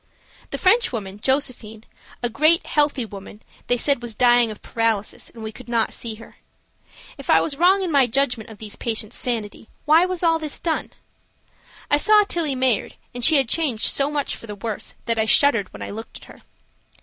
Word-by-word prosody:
The - - -4
Frenchwoman, 235 - +1
Josephine, 245 -4 -2 0.4
a - - +2
great, 310 +8 +3
healthy 290 -4 +1
woman, 205 0 -11 0.2
they 245 - +2
said 275 0 0
was 235 -2 -6
dying 240 0 +4
of 215 - -9
paralysis, 225 -3 -2
and 225 - -12
we 220 - -5
could 250 +2 -13
not 230 -2 0
see 225 -2 -5
her. 225 - -15 0.8
If - - -10
I - - +6
was 290 - -2
wrong 370 +5 +3
in 360 - -2
my 275 -4 +4
judgment 245 -3 -1
of 220 - -12
these 210 0 -7
patients' 220 -2 -3
sanity, 225 -3 -3 0.2
why 320 +4 +5
was 370 -1 -4
all 330 -1 +3
this 305 -2 -5
done? 325 -2 -2 1.0
I 290 - +5
saw 425 +6 +5
Tillie 330 -8 -1
Mayard, 255 -4 0 0.2
and 245 0 -6
she 320 - +6
had 270 -4 +3
changed 260 -5 +1
so 275 0 +1
much 295 -1 -2
for 230 - -12
the 210 - -6
worse 210 +1 -6
that 230 -1 0
I 220 - +2
shuddered 230 -4 +3
when - - -9
I - - -6
looked 225 +2 -8
at - - -15
her. - - -15
245 Hz, 195 wpm, -22 LUFS, 220-295 Hz, 1.0 s, I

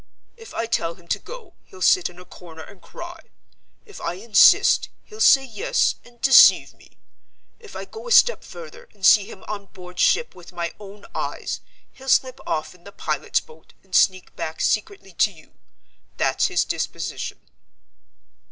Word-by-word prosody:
If 455 -2 -13
I 230 - -1
tell 170 -7 -2
him 175 -2 -21
to 200 - 0
go, 465 - -12
he'll 185 - -16
sit 180 - +4
in 175 - -17
a 180 - -13
corner 165 -3 -12
and 195 +1 -16
cry. 345 0 -10 0.7
If 415 - -13
I 170 +1 -3
insist, 210 +3 +4
he'll 430 - -14
say 270 -10 +6
Yes, 480 - 0
and 240 0 -20
deceive 270 0 +6
me. - - -23 0.6
If 435 -3 -14
I - - -6
go 460 +2 -11
a - - -5
step 485 +1 +5
further, 485 0 -12
and 195 - -4
see 200 +1 +6
him 190 - -12
on 200 -2 -6
board 180 -1 -13
ship 475 - +2
with 180 -1 -15
my 170 -1 -4
own 205 0 -13
eyes, - - -4 0.3
he'll 265 0 -10
slip 260 0 +2
off 155 +2 -3
in 180 -1 -22
the 200 - -12
pilot's 155 -7 -2
boat, 155 +1 -19
and 190 -1 -25
sneak 185 0 +2
back 160 0 -6
secretly 215 - -2
to 210 - +4
you. 160 -4 -19 0.7
That's - - +1
his - - 0
disposition." - - -4
205 Hz, 175 wpm, -22 LUFS, -, 0.7 s, say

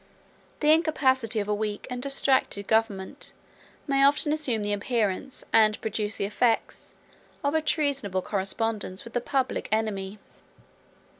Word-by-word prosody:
The 300 0 +5
incapacity 260 -8 +2
of 205 - -2
a 210 - +1
weak 210 0 -3
and 250 0 -4
distracted 270 -6 +1
government 215 -4 -1 0.5
may 275 -1 +2
often 290 +2 +3
assume 255 -9 -1
the 205 0 -1
appearance, 215 +3 -1
and 215 -1 +5
produce 215 -1 -2
the - - -1
effects, 225 +3 -1 0.5
of 285 +1 +1
a 320 - +2
treasonable 280 - 0
correspondence 200 0 -1
with 235 - -11
the 245 - 0
public 265 +1 -1
enemy. 210 -2 -1
225 Hz, 135 wpm, -26 LUFS, 205-275 Hz, 0.5 s, The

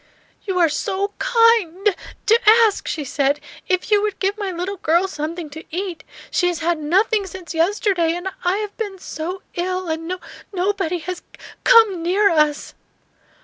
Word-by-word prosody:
"You 380 -3 -2
are 345 -2 +5
so 390 +6 -2
kin 455 -6 +3
d 415 -2 +4 0.3
to 455 +2 +5 0.2
ask," 425 -3 +1
she 310 - -2
said. 280 +1 0 0.3
"If 370 +3 0
you 415 -1 +5
would 420 -2 -2
give 395 +1 0
my 410 -3 -3
little 365 +3 -4
girl 340 +3 +2
something 320 0 -5
to 315 +2 -9
eat! 355 -2 -4 0.3
She 355 - +2
has 350 -1 0
had 335 0 0
nothing 390 +7 +1
since 365 -1 -8
yesterday, 345 -1 +1
and 355 +2 -5 0.2
I 360 +2 +1
have 420 -1 -5
been 410 -4 -4
so 360 +1 -6
ill; 365 0 -2
and 320 +1 -3
no 365 +1 -3 0.3
nobody 375 -2 -1
has 350 +2 -5 0.2
c - - 0
ome 390 -6 -4
near 390 +4 +3
us!" 300 -2 +1
365 Hz, 175 wpm, -21 LUFS, 330-400 Hz, 0.3 s, are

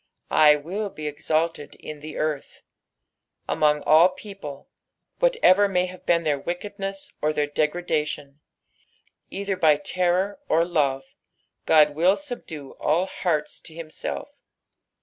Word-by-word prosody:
" - - -40
T - - -1
aill 155 +7 +4
be 155 - -7
exalted 155 +1 -1
in 155 -1 -9
the 155 +1 -8
earth," 155 -2 -3 0.8
among 150 -1 +2
all 160 +4 +6
people, 185 -7 -9 0.5
whatever 465 - +4
may 180 -2 +1
have 185 0 -11
been 170 -1 +3
their 150 -3 0
wickedness 195 +4 -5
or 150 - +2
their 150 -1 0
degradation. 150 -2 -2 0.9
Either 195 0 -3
by 160 -5 +5
terror 180 - 0
or 165 +1 +3
love 140 -6 0 0.6
God 150 -2 +6
will 175 +6 +3
subdue 185 - -8
all 165 +5 +2
hearts 165 -5 -2
to 160 - -11
himself. 155 - -6
160 Hz, 130 wpm, -24 LUFS, 150-185 Hz, 0.9 s, all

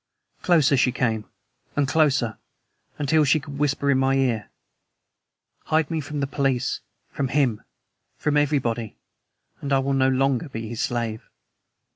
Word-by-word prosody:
Closer 155 -6 +4
she 125 0 +3
came, 110 -4 -1 0.5
and 145 -1 +2
closer, 140 -7 +2 0.6
until 150 +2 +3
she 150 +2 +3
could 140 -1 -9
whisper 140 -1 +1
in 130 - +3
my 135 0 +2
ear. 125 -5 0 1.2
"Hide 155 0 +1
me 160 -1 -1
from 150 +1 -6
your 140 - 0
police, 135 -2 0 0.3
from 140 - -1
HIM, 130 -5 +1 0.6
from 150 - 0
everybody, 125 -7 0 0.6
and 140 - -4
I 135 - +5
will 135 +1 0
no 130 -1 +3
longer 135 +2 +1
be 115 -3 -5
his 115 0 -4
slave." 115 -2 -3
135 Hz, 145 wpm, -24 LUFS, 125-145 Hz, 1.2 s, I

